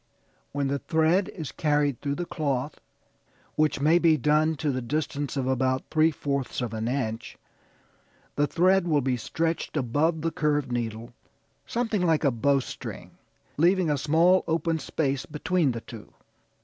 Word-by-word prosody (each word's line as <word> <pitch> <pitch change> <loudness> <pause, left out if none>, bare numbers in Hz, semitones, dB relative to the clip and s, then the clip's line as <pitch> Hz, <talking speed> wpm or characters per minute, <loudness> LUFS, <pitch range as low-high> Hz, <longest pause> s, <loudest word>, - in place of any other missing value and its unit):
When 140 -1 -1
the 140 +1 -1
thread 160 +5 +2
is 160 -6 -6
carried 145 -4 0
through 140 -1 -2
the 175 - -3
cloth, 145 -4 -3 0.7
which 155 -2 +1
may 155 +5 +4
be 165 -2 +4
done 150 +3 +2
to 150 0 -1
the 130 -1 -2
distance 145 +2 -3
of 135 - 0
about 130 0 +1
three 155 +1 +4
fourths 140 -3 -3
of 120 -3 -3
an 110 +1 -3
inch 120 -3 -3 1.0
the 145 - +2
thread 185 +2 +3
will 150 -3 +2
be 130 -1 0
stretched 165 +7 -2
above 150 +5 +1
the 165 - 0
curved 145 -5 0
needle, 115 0 -4 0.5
something 225 -4 -1
like 165 -3 +2
a 140 - +4
bowstring, 135 +3 -2 0.5
leaving 175 +1 +3
a - - +2
small 165 +6 +4
open 165 0 0
space 140 -3 -2
between 155 0 0
the 115 -1 -5
two. 115 -3 -11
150 Hz, 155 wpm, -26 LUFS, 130-160 Hz, 1.0 s, may